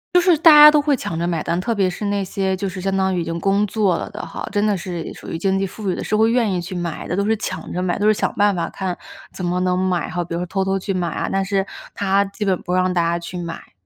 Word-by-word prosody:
就 355 - +7
是 350 -3 +4
大 325 +1 +7
家 300 0 +10
都 300 0 +4
会 290 -1 +2
抢 175 -9 -5
着 170 - -1
买 170 -3 -1
单， 170 +3 -1
特 230 +5 -1
别 195 -3 +1
是 180 +4 -5
那 200 -1 0
些 190 0 -1
就 195 +1 -3
是 185 0 -7
相 195 +1 -1
当 190 0 +1
于 175 - 0
已 - - -2
经 165 +1 -4
工 200 +3 +2
作 200 -4 +1
了 - - -4
的 210 - -6
哈， - - -6
真 205 0 +1
的 210 -2 +2
是 175 -2 -5
属 - - -12
于 165 - -4
经 195 +2 +1
济 195 - 0
富 200 +1 -5
裕 180 - 0
的， - - -5
是 215 - -1
会 220 +1 +4
愿 230 -4 +2
意 180 - -1
去 185 +2 -7
买 175 -2 -4
的， - - -2
都 200 - +1
是 220 +1 +2
抢 - - -5
着 180 - -2
买 180 -1 0
的， - - -6
都 210 - +3
是 215 - +6
想 - - -1
办 205 -1 +3
法 170 - -2
看， 185 -2 -4 0.4
怎 185 - -7
么 180 +1 0
能 180 0 +1
买 185 -2 0
哈， 175 -1 -2
比 170 0 -5
如 - - -2
说 - - -2
偷 190 +2 -1
偷 190 0 0
去 195 +1 -3
买 180 -2 -1
啊， 165 - -3
但 195 0 +1
是 195 0 0 0.3
她 200 0 +2
基 200 +2 -5
本 190 -2 0
不 180 - -4
让 185 0 +2
大 175 - +2
家 170 0 +1
去 175 +1 -7
买。 170 - -8
190 Hz, 345 characters per minute, -20 LUFS, 180-205 Hz, 0.4 s, 家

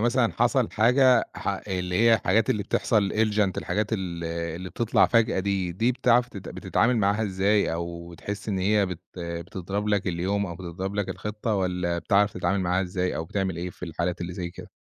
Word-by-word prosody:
مثلًا 120 0 +2
حصل 120 +1 +2
حاجة 125 +2 +4
ح - - -4
اللي 90 -1 -3
هي 115 0 +6
الحاجات 105 +1 +2
اللي 105 - 0
بتحصل 100 0 +1
Elegant 105 -3 +2
الحاجات 105 +1 -2
ال 90 -5 -3
اللي 85 +2 -4
بتطلع 115 -2 +3
فجأة 115 -4 +2
دي، 95 -2 -1
دي 115 +8 +1
بتعرف 125 0 +3
ت - - -12
بتتعامل 115 +5 0
معاها 100 +1 +2
إزاي؟ 100 0 +1
أو 85 0 -5
بتحس 100 +6 -6
إن 95 -3 0
هي 100 +1 +2
بت 90 -2 -6 0.2
بتضرب 90 +4 -4
لك 105 -2 +1
اليوم 95 +3 0
أو 85 - -6
بتضرب 90 +3 -5
لك 105 -2 -1
الخطة 105 +1 -3
والَّا 90 -3 -1
بتعرف 100 +3 +2
تتعامل 95 +2 0
معاها 90 +1 +1
إزاي 90 0 -2
أو 80 - -3
بتعمل 95 0 -2
إيه 90 +1 -4
في 90 - -8
الحالات 85 +1 -3
اللي 90 +1 -4
زي 85 -1 -4
كده؟ 85 - -12
95 Hz, 190 wpm, -26 LUFS, 90-105 Hz, 0.2 s, هي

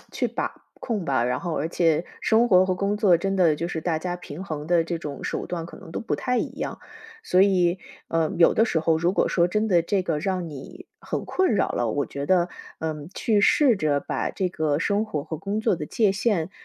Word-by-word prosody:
去 - - -1
把 - - -3 0.3
控 215 -7 -3
吧。 130 -3 +1
然 125 - -1
后 170 -3 -3
而 150 - -1
且 165 -1 +1 0.2
生 225 +2 +3
活 185 -2 +5
和 185 - +1
工 200 +3 -1
作 195 -5 +5
真 195 +3 -2
的 170 -5 +3
就 170 - -2
是 165 -2 -4
大 160 -1 -1
家 175 +2 -3
平 180 0 -8
衡 155 -5 -5
的 170 0 +3
这 170 0 -3
种 145 -4 -7
手 - - -3
段 170 -2 -4
可 170 - -11
能 - - -12
都 - - -4
不 225 - -2
太 250 -1 -1
一 - - 0
样。 - - -4 0.4
所 185 - +2
以， 185 -2 +3 0.3
呃， 165 -1 +1
有 170 - +6
的 225 - +3
时 170 - +1
候 160 0 +2
如 170 +2 +1
果 - - +2
说 175 -1 +2
真 215 +4 0
的 175 -4 +4
这 185 +3 0
个 165 -4 -1
让 180 0 -2
你 250 - -10
很 - - -4
困 375 -11 +1
扰 - - +1
了， 120 - -1
我 145 +5 0
觉 140 0 -6
得， 175 0 +2 0.3
嗯， 155 -2 -4
去 215 -3 +2
试 260 +4 +5
着 150 -5 +1
把 - - -2
这 185 -2 -2
个 155 -4 0
生 205 +6 0
活 150 -10 -3
和 160 -1 -5
工 200 +5 -2
作 220 -4 +1
的 150 - -5
界 210 +2 +2
限， 195 -4 0
175 Hz, 255 characters per minute, -24 LUFS, 160-200 Hz, 0.4 s, 有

